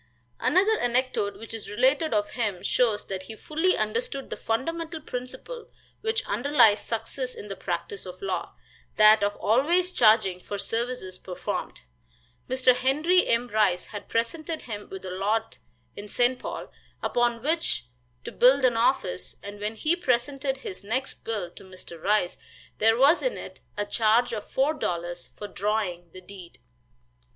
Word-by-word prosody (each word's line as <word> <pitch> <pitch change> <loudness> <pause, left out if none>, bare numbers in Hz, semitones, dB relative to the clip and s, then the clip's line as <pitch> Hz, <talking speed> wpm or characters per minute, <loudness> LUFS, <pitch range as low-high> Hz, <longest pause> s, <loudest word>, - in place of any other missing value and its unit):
Another 410 +4 +3
anecdote 245 -4 0
which 225 - -9
is 225 -2 -6
related 265 +8 +2
of 205 -1 0
him 210 -7 -2
shows 225 -4 +2
that 190 -1 -4
he 205 +4 -9
fully 320 - 0
understood 460 - -2
the - - -2
fundamental 325 +8 -2
principle 310 - -7 0.3
which 445 +1 0
underlies 225 -1 +4
success 250 +3 -3
in 210 - -9
the 195 - -4
practice 185 +2 -4
of 180 0 -9
law 195 -1 -3 0.4
that 215 0 +7
of 205 0 +1
always 335 - +2
charging 215 - +4
for 205 +2 -5
services 225 -4 -3
performed. 180 - -5 0.7
Mr. 255 0 +4
Henry 300 +8 +3
M. 235 +1 +2
Rice 205 -5 +2
had 205 - -7
presented 310 +8 -2
him 210 -3 -7
with 190 0 -8
a 185 - -5
lot 210 +4 -1 0.4
in 205 +1 -8
St. 245 +4 +2
Paul, - - -6 0.3
upon 240 -1 +1
which 310 - 0 0.4
to - - -6
build 260 +2 +5
an 240 -2 +3
office, 230 -6 0
and 205 0 -8
when 210 +2 -3
he 310 +9 +1
presented 270 -2 0
his 200 -7 -7
next 255 +6 -3
bill 205 -6 -3
to - - -14
Mr. 185 -3 -11
Rice 200 -2 +1 0.4
there 225 +1 +4
was 280 +7 +5
in - - -1
it - - -9 0.2
a 205 - 0
charge 225 +3 +2
of 210 -2 -5
four 275 +4 +2
dollars 175 - -4
for 205 - -5
drawing 195 -4 -2
the 185 - -11
deed. 185 -2 -12
230 Hz, 160 wpm, -26 LUFS, 205-270 Hz, 0.7 s, that